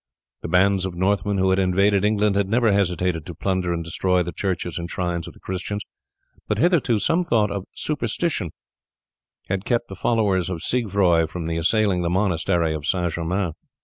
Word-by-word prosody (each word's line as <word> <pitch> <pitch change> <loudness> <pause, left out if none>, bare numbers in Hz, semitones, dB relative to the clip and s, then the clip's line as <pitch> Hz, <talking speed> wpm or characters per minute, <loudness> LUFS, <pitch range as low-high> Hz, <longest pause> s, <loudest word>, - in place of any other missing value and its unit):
The - - -5
bands 95 +2 +3
of 90 - -7
Northmen 100 +2 +1
who 95 0 +2
had 95 - +2
invaded 100 +2 +3
England 105 -1 +2
had 100 -1 +1
never 115 0 +3
hesitated 90 -4 0
to 85 - -7
plunder 95 0 -1
and 85 -1 -2
destroy 90 +2 +1
the 85 - -5
churches 90 -2 -3
and 85 0 -5
shrines 85 -2 -2
of - - -11
the - - -17
Christians, 95 +3 -4 0.6
but - - 0
hitherto 165 -10 +3
some 165 - +2
thought 110 - +1
of 100 -2 -4
superstition 145 - -1 1.0
had 95 0 -2
kept 120 0 -1
the 95 - -7
followers 100 -4 +1
of 85 -3 -4
Siegfroi 95 -8 +2
from 80 +1 -5
assailing 90 +3 +2
the 85 - 0
monastery 85 -3 +1
of 75 -2 -5
St. 90 -2 0
Germain. 90 +2 -1
95 Hz, 180 wpm, -23 LUFS, 90-105 Hz, 1.0 s, bands